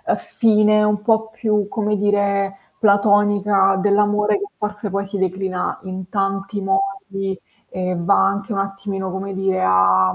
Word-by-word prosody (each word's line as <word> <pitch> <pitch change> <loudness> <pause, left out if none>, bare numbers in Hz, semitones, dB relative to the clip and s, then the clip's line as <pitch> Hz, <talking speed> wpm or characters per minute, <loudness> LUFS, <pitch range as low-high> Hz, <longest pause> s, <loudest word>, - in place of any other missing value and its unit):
fine, 215 -2 +2
un 210 -1 +1
po' 220 0 +1
più 215 -2 -1
come 210 0 -1
dire, 200 -1 0 0.2
platonica 205 -1 +3
dell'amore 210 +1 +2
che 405 - -4
forse 210 0 -4
poi 200 +1 -2
si 195 +1 -5
declina 190 0 -2
in 185 0 -7
tanti 195 0 -2
modi 195 - -2 0.3
e 185 0 -3
va 175 +4 +3
anche 200 +2 -3
un 195 - -2
attimino, 195 -1 -4
come 195 +1 -5
dire 190 0 -1
a, 95 0 +3
200 Hz, 140 wpm, -20 LUFS, 195-210 Hz, 0.3 s, platonica